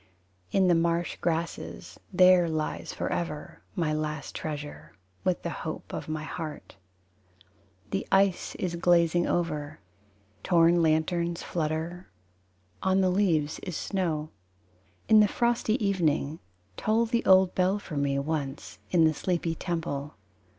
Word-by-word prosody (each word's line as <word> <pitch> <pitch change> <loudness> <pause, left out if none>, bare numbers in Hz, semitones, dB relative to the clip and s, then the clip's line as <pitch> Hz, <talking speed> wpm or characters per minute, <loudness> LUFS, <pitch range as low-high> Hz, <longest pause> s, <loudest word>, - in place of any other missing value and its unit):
In 190 -1 +3
the 175 - +5
marsh 170 +1 +1
grasses 170 0 -3
There 180 -2 +6
lies 155 -1 -3
forever 150 -3 -4
My 160 -3 0
last 150 -2 -3
treasure, 150 -2 -6 0.3
With 185 -2 0
the 170 - -2
hope 155 - -6
of - - -5
my 155 0 -3
heart. 155 - -7 1.2
The 195 - -2
ice 195 -1 +2
is 175 -2 -2
glazing 175 0 +3
over, 155 -5 -2 0.6
Torn 170 -1 +4
lanterns 170 +2 +1
flutter, 165 +2 -3 0.7
On 190 0 +2
the 185 -1 +3
leaves 165 -6 +1
is 180 -5 -5
snow. 160 -6 -2 0.8
In 220 -1 +7
the 210 - +6
frosty 235 0 +1
evening 160 -5 0 0.4
Toll 225 +2 +2
the 235 0 0
old 190 -1 +6
bell 185 +2 +2
for 185 -6 -8
me 140 -1 0
Once, 140 -1 -4
in 170 -3 +4
the 160 - +3
sleepy 170 +1 -1
temple. 160 - -4
170 Hz, 130 wpm, -28 LUFS, 155-185 Hz, 1.2 s, In